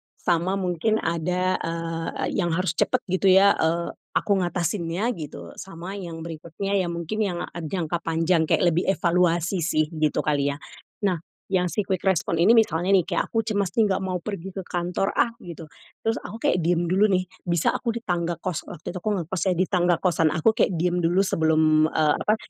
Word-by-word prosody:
sama 175 +2 0
mungkin 190 +3 0
ada, 180 +3 0
eee, 165 0 -3
yang 175 -3 +1
harus 185 -2 0
cepat - - +1
gitu 190 +1 +2
ya, 195 +2 +7
eee, 170 +1 0 0.2
aku 205 - 0
ngatasinnya 175 +4 -1
gitu, 85 - -8
sama 190 0 -7
yang 165 -3 -7
berikutnya 170 +5 -5
yang 170 -2 -2
mungkin 170 +6 -4
yang 185 -4 -1 0.2
jangka 170 0 -3
panjang 165 0 +1
kayak - - +2
lebih 175 +3 0
evaluasi 175 -1 +2
sih 155 -1 +1
gitu 155 -1 0
kali 145 -1 +1
ya. - - -11 0.5
Nah 180 -5 +1 0.3
yang 180 -2 0
si - - -3
quick 185 -2 -1
response 170 -3 +1
ini 215 - +6
misalnya 200 -5 +3
nih, 185 -4 +4
kayak - - -1
aku 225 - +1
cemas 205 -4 -1
nih, 215 - +5
"Nggak 190 0 -1
mau 185 -1 -2
pergi 195 -1 -6
ke 190 -1 -7
kantor 175 +2 -2
ah," 235 - +2
gitu, 170 -1 -9 0.4
terus 225 0 0
aku 220 - -8
kayak 180 - +2
diem 170 +1 +1
dulu 205 +3 +4
nih, 185 -2 +2 0.2
bisa 170 -2 +2
aku 235 -2 -2
di 235 - -5
tangga 170 -1 -1
kos 180 -3 -4
waktu 155 - -7
itu 180 - -6
aku 210 +2 -1
ngekos 175 -1 -3
ya, 185 - +3
di 185 - +2
tangga 175 -2 +2
kosan 165 -2 +1
aku 160 +8 +3
kayak 215 -5 +1
diem 175 +2 0
dulu 175 +3 +2
sebelum, 155 -3 +3
eee, 155 -2 +2
apa, 215 - +2
175 Hz, 195 wpm, -24 LUFS, 165-190 Hz, 0.5 s, ya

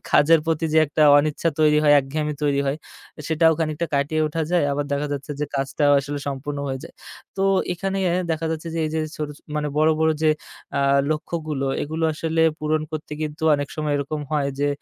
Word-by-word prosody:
কাজের 160 +2 +5
প্রতি 165 0 0
যে, 160 - +6
একটা 145 +2 0 0.2
অনিচ্ছা 155 +3 0
তৈরি 150 -1 +5
হয়, 145 - +6
একঘেয়ামি 150 +2 -3
তৈরি 140 -1 +2
হয় 135 +2 0 0.5
সেটাও 160 0 +4
খানিকটা 160 +1 -1
কাটিয়ে 145 +3 0
ওঠা 160 +1 -2
যায়। 175 -4 +3
আবার 145 +1 -1
দেখা 145 +1 0
যাচ্ছে 140 +1 -5
যে, - - +1
কাজটাও 140 +1 +1
আসলে 145 +1 -4
সম্পূর্ণ 140 +1 -4
হয়ে 130 0 -3
যায়। - - -12 0.4
তো 195 - 0 0.3
এখানে 195 +2 -3 0.3
দেখা 160 0 -1
যাচ্ছে 160 +1 -4
যে, 165 - -2
এই - - -4
যে, 160 - 0 0.2
ছোট 150 -1 -3 0.3
মানে 150 0 -1
বড়, 155 +1 +4
বড়, 160 0 +4
যে, 155 - +5 0.5
আ - - +2 0.3
লক্ষ্যগুলো 155 -2 -2 0.2
এগুলো 160 +2 -2
আসলে 160 +1 0 0.2
পূরণ 155 0 0
করতে 155 -1 -6
কিন্তু 155 0 -5
অনেক 145 -1 -2
সময় 150 -1 -1
এরকম 145 +2 -3
হয় 145 -2 +1
যে, 145 - +2
150 Hz, 195 wpm, -23 LUFS, 145-160 Hz, 0.5 s, যে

